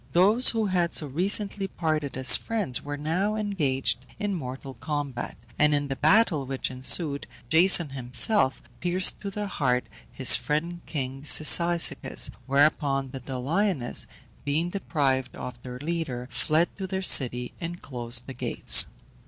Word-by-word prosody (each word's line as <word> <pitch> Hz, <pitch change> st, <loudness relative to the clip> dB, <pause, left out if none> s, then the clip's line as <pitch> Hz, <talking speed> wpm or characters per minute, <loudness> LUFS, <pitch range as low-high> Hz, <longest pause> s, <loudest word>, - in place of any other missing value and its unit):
Those 210 Hz, +8 st, +5 dB
who 225 Hz, -2 st, 0 dB
had 180 Hz, -3 st, -1 dB
so 155 Hz, -, +1 dB
recently 195 Hz, +6 st, 0 dB
parted 155 Hz, -7 st, -3 dB
as 130 Hz, 0 st, +7 dB
friends 210 Hz, -, -2 dB
were 145 Hz, 0 st, -7 dB
now 180 Hz, +8 st, -2 dB
engaged 150 Hz, -, -2 dB
in 205 Hz, -1 st, -3 dB
mortal 135 Hz, -4 st, -7 dB
combat, 145 Hz, -4 st, -5 dB, 0.2 s
and 150 Hz, 0 st, +3 dB
in 145 Hz, -1 st, -3 dB
the 135 Hz, -, -3 dB
battle 160 Hz, 0 st, +2 dB
which 135 Hz, 0 st, -4 dB
ensued, 140 Hz, +3 st, 0 dB, 0.2 s
Jason 170 Hz, 0 st, +4 dB
himself 130 Hz, -, +1 dB, 0.2 s
pierced 180 Hz, +1 st, +2 dB
to 200 Hz, -, -5 dB
the 210 Hz, +1 st, -5 dB
heart 125 Hz, -10 st, -1 dB, 0.3 s
his 130 Hz, -, +6 dB
friend 155 Hz, +8 st, -3 dB
king 135 Hz, -3 st, -5 dB
Cyzicus; 170 Hz, +3 st, +4 dB, 0.2 s
whereupon 140 Hz, -1 st, +1 dB
the 135 Hz, -, -8 dB
Doliones, 135 Hz, +4 st, -2 dB, 0.4 s
being 155 Hz, +5 st, -2 dB
deprived 140 Hz, -9 st, -2 dB
of 125 Hz, -1 st, -9 dB
their 125 Hz, 0 st, -9 dB
leader, 145 Hz, -4 st, -5 dB
fled 160 Hz, +3 st, -1 dB
to 190 Hz, -, -4 dB
their 190 Hz, 0 st, -4 dB
city 125 Hz, -7 st, +3 dB
and 175 Hz, +1 st, -6 dB
closed 120 Hz, -2 st, -2 dB
the 135 Hz, -, -9 dB
gates. -, -, +4 dB
150 Hz, 145 wpm, -25 LUFS, 130-180 Hz, 0.4 s, as